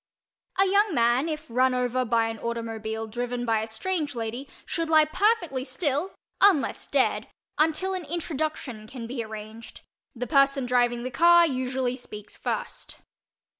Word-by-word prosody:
A 390 - +6
young 400 -1 +3
man, 240 +6 +3
if 305 -1 -4
run 255 +2 +2
over 250 0 0
by 230 -1 +2
an 225 -1 -6
automobile 225 -1 -4
driven 245 +2 -3
by 225 -2 +2
a 220 - -4
strange 295 +5 -2
lady, 235 +4 -4 0.2
should 330 -1 -2
lie 310 -1 +6
perfectly 345 - +1
still 295 +5 -2 0.3
(unless 385 -8 +3
dead) - - +1 0.3
until 320 +5 +2
an 365 -3 -4
introduction 305 -8 -4
can 240 0 -7
be 235 0 -4
arranged; 220 +1 -9 0.3
the 245 +1 -3
person 275 -1 +3
driving 245 -1 +1
the 255 - -4
car 345 +4 +6
usually 255 -3 -1
speaks 210 -5 -10
first. - - -4
255 Hz, 150 wpm, -26 LUFS, 235-315 Hz, 0.3 s, A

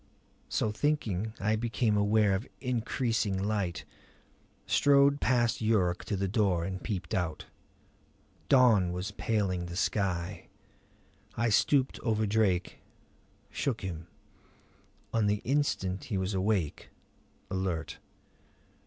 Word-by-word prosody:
So 110 - 0
thinking 110 -6 -1
I 105 +3 +1
became 115 -1 0
aware 105 0 +3
of 95 +7 -2
increasing 115 -4 -1
light; 100 -3 -2 0.8
strode 140 0 +4
past 120 -2 +2
Yuruk 100 -5 +1
to 105 - -2
the 100 0 -1
door 95 -5 +1
and 95 0 -5
peeped 95 -6 -4
out. 85 -4 -2 1.0
Dawn 115 -10 +5
was 90 +3 -4
paling 100 -5 -1
the 85 - -7
sky. 95 -1 -1 0.9
I 115 +1 +2
stooped 130 +5 +2
over 110 -2 0
Drake, 100 -4 +1 0.7
shook 130 -5 -2
him. 85 -3 -6 1.1
On 110 -2 +2
the 105 0 0
instant 120 -9 0
he 105 - -2
was 95 +2 -1
awake, 95 -5 -1 0.6
alert. 95 -4 -3
105 Hz, 110 wpm, -30 LUFS, 95-115 Hz, 1.1 s, Dawn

